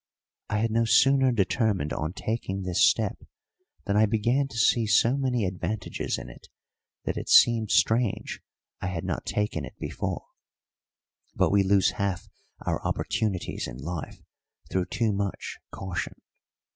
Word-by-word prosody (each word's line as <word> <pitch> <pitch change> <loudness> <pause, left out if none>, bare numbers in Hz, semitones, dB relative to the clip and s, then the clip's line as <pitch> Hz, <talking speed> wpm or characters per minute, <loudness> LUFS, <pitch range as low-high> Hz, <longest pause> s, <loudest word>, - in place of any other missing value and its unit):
I 105 - 0
had 115 +1 0
no 115 +1 +2
sooner 135 +3 +5
determined 100 -6 +1
on 80 +2 -3
taking 100 -2 -3
this 90 -2 +4
step - - -1 0.7
than 100 - 0
I 110 +1 +5
began 120 +6 +1
to 115 - -9
see 115 0 +3
so 115 +5 +4
many 130 -5 0
advantages 95 +2 -3
in - - -8
it - - -13 0.6
that - - -2
it - - -5
seemed 115 -3 +6
strange 115 -1 +1 0.4
I - - -2
had 90 -3 -3
not - - -3
taken 105 -7 -1
it 65 - -9
before; - - -4 1.1
but - - +2
we 100 0 +5
lose 95 -1 +3
half 100 -3 -2 0.4
our - - -1
opportunities 100 -5 -2
in 60 -1 -8
life 80 +4 -6 0.5
through 95 -1 +1
too 110 -3 0
much 100 -1 -3
caution. 95 -2 -4
105 Hz, 145 wpm, -27 LUFS, 95-115 Hz, 1.1 s, seemed